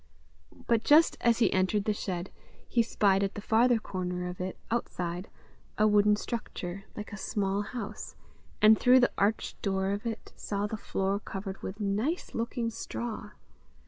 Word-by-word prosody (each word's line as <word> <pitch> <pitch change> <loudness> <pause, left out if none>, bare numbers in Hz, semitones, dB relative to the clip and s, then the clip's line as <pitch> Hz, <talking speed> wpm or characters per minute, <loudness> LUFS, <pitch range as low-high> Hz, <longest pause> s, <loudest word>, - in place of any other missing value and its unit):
But 230 -1 +2
just 315 +3 +6
as 235 -1 +4
he 235 - +3
entered 190 +2 +2
the 215 - +2
shed, 185 -3 -4 0.4
he 235 - +3
spied 200 -4 +2
at 195 - -2
the - - -4
farther 235 +3 +4
corner 180 -4 -3
of 180 0 -6
it, 185 0 -4
outside, 180 -5 -2 0.5
a 215 - +4
wooden 210 0 +5
structure, 195 -4 -5
like 210 0 -6
a - - -5
small 195 0 -1
house, 210 -1 -6 0.5
and 215 +1 +8
through 255 +1 +6
the 245 - +3
arched 210 +2 0
door 190 -1 0
of 205 +3 -3
it 225 -1 -6
saw 200 0 -2
the 210 - -3
floor 195 -1 -1
covered 195 -1 -6
with 195 +3 -6
nice 215 - -1
looking 230 0 -2
straw. 225 -1 -5
210 Hz, 165 wpm, -29 LUFS, 195-230 Hz, 0.5 s, and